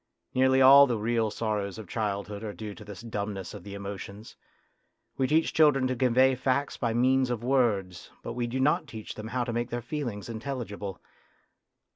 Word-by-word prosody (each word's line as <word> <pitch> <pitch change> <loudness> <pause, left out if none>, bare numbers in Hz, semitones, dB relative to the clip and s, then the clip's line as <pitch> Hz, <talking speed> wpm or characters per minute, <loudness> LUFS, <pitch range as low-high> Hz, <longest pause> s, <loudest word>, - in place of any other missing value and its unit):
Nearly 130 +1 +4
all 140 +2 +9
the 120 -3 0
real 110 +1 0
sorrows 105 -2 -2
of 110 - -9
childhood 105 -1 -3
are 105 -2 -5
due 105 -2 -6
to 105 - -12
this 100 -1 -9
dumbness 100 -4 -5
of 100 -4 -9
the 100 +1 -8
emotions; 100 +1 -8 0.8
we 130 - +1
teach 160 +3 +2
children 145 -4 +4
to 130 0 0
convey 130 +1 +4
facts 130 +2 0
by 120 -3 -1
means 130 +1 +3
of 120 -2 -3
words, 110 -9 0
but 115 - -5
we 120 0 -2
do 125 +3 -3
not 145 +3 +2
teach 110 -2 -8
them 110 0 -7
how 125 +2 -1
to 120 -1 -4
make 120 +1 -2
their 120 - -3
feelings 120 -4 -5
in 115 -2 -5
telligible. 105 -7 -5
115 Hz, 190 wpm, -28 LUFS, 105-130 Hz, 0.8 s, all